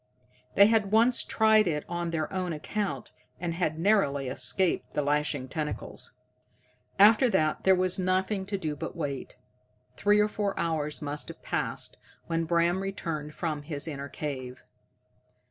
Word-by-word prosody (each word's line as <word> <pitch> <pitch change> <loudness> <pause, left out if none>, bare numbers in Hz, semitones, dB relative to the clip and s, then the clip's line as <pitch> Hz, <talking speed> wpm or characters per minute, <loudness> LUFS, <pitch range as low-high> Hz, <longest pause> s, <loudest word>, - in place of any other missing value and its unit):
They 200 - +8
had 215 -2 +2
once 235 +3 +4
tried 220 -2 +4
it 150 -3 -1
on 175 0 -3
their 160 +1 -2
own 185 -2 -2
account, 155 - -3 0.3
and 170 -1 -2
had 165 -2 -1
narrowly 160 -8 +2
escaped 135 +8 0
the 150 - +1
lashing 145 -2 0
tentacles. 150 +2 -5 0.8
After 220 +5 +7
that 155 -7 +1
there 190 0 +6
was 185 0 +1
nothing 190 +2 0
to 200 0 -2
do 155 -5 -3
but 145 - -6
wait. 145 -5 -4 0.6
Three 205 +6 +3
or 210 - +4
four 205 -1 -2
hours 155 -3 -1
must 145 0 -3
have - - -11
passed - - -3 0.3
when 165 0 -1
Bram 170 +2 +2
returned 165 -6 -4
from 155 -4 -2
his 145 0 -4
inner 140 -2 -5
cave. 130 -3 -6
170 Hz, 150 wpm, -28 LUFS, 150-195 Hz, 0.8 s, They